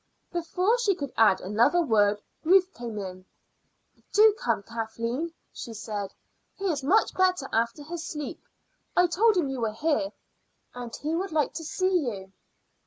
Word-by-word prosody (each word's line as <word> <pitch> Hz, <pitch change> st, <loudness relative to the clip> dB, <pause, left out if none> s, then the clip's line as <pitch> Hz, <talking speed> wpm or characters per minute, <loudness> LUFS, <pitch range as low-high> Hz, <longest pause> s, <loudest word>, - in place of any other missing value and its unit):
Before 360 Hz, +7 st, +1 dB
she 410 Hz, -5 st, +2 dB
could 280 Hz, -5 st, -5 dB
add 215 Hz, -4 st, +5 dB
another 230 Hz, -, +3 dB
word 210 Hz, -6 st, +2 dB, 0.2 s
Ruth 375 Hz, +3 st, +4 dB
came 235 Hz, -3 st, -6 dB
in. 185 Hz, -2 st, -6 dB, 0.9 s
"Do 430 Hz, +1 st, +7 dB
come, 485 Hz, -, 0 dB
Kathleen," 230 Hz, +7 st, -3 dB, 0.2 s
she 230 Hz, -, -7 dB
said. 205 Hz, -2 st, -4 dB, 0.4 s
"He 395 Hz, -, -6 dB
is 290 Hz, -3 st, -2 dB
much 400 Hz, +11 st, +3 dB
better 370 Hz, -6 st, +2 dB
after 235 Hz, +6 st, 0 dB
his 335 Hz, +2 st, -6 dB
sleep. 300 Hz, -4 st, -6 dB, 0.6 s
I 355 Hz, -, +7 dB
told 390 Hz, +5 st, +3 dB
him 335 Hz, -6 st, +2 dB
you 270 Hz, -1 st, -4 dB
were 220 Hz, -2 st, 0 dB
here, 295 Hz, +4 st, 0 dB, 0.6 s
and 245 Hz, -1 st, -7 dB
he 305 Hz, +2 st, -3 dB
would 370 Hz, +3 st, -2 dB
like 305 Hz, -2 st, +1 dB
to 325 Hz, -, -5 dB
see 370 Hz, +4 st, +1 dB
you." 190 Hz, -3 st, -8 dB
290 Hz, 160 wpm, -27 LUFS, 225-360 Hz, 0.9 s, Do